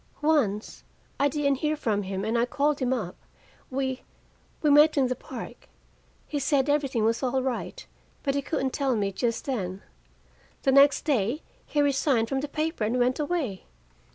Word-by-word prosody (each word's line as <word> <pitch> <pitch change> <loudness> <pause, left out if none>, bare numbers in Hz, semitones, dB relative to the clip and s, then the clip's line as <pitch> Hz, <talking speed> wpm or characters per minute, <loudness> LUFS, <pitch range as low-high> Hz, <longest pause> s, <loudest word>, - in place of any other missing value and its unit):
"Once. 250 -10 +1 0.4
I 285 - +4
didn't 280 -2 0
hear 305 +1 0
from 220 -8 0
him, 195 0 -4
and 225 +2 -1
I 235 0 +3
called 290 +2 +1
him 255 -2 0
up. 215 -9 -2 0.5
We 265 -1 -2 0.6
we 300 - +4
met 300 +2 +6
in 260 -3 +3
the 255 - 0
park. - - -9 0.6
He 295 - -2
said 280 -1 +2
everything 275 -6 +1
was 225 +1 +1
all 260 0 0
right, 265 - -4 0.4
but 275 - +1
he 280 - 0
couldn't 265 -3 -2
tell 275 -4 +1
me 200 -2 0
just 230 +3 -2
then. 195 -8 -3 0.8
The 270 - +3
next 280 +1 +5
day 265 0 0 0.2
he 295 -1 +1
resigned 270 -5 +2
from 270 - 0
the 295 - -3
paper 310 -3 -2
and 225 +4 0
went 250 +2 +1
away. 290 - -2
265 Hz, 175 wpm, -27 LUFS, 230-290 Hz, 0.8 s, met